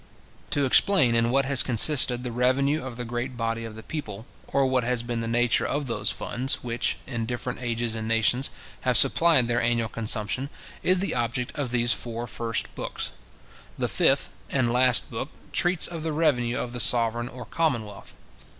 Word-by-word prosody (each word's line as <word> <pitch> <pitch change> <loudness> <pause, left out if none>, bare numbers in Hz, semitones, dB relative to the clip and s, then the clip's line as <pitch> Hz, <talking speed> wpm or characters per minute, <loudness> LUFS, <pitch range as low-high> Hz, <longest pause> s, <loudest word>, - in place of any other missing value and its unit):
To 145 -1 0
explain 135 - +5
in 115 0 +2
what 135 +2 +2
has 135 -1 +5
consisted 125 0 +3
the 125 - -4
revenue 135 +5 0
of 125 -3 -8
the 125 - -5
great 120 +2 -5
body 115 0 -3
of 110 -1 -9
the 110 - -10
people, 110 -9 -7 0.2
or 140 -1 0
what 130 -1 0
has 120 0 0
been 120 -1 -4
the 115 - -4
nature 120 +1 +1
of 145 +1 -2
those 105 -4 -1
funds, 130 +3 -1
which, 120 -1 -1
in 120 -3 -5
different 125 +1 -5
ages 120 -1 -2
and 110 -1 -5
nations, 115 +4 +2 0.3
have 125 -2 +2
supplied 140 -1 +4
their 120 0 0
annual 115 -1 0
consumption, 115 +4 -1 0.3
is 185 +1 +3
the 195 - 0
object 120 +1 -3
of 145 -4 -3
these 120 0 +3
four 120 0 -5
first 115 -1 -3
books. - - -4 0.7
The - - -1
fifth - - +1 0.2
and 120 -3 0
last 125 0 +4
book - - -5 0.2
treats 175 -1 +1
of 170 -2 -4
the 160 0 -3
revenue 130 -7 0
of 120 - -5
the 125 - -5
sovereign, 120 0 +4
or 125 -2 -10
commonwealth. 115 -10 -3
120 Hz, 185 wpm, -25 LUFS, 115-135 Hz, 0.7 s, explain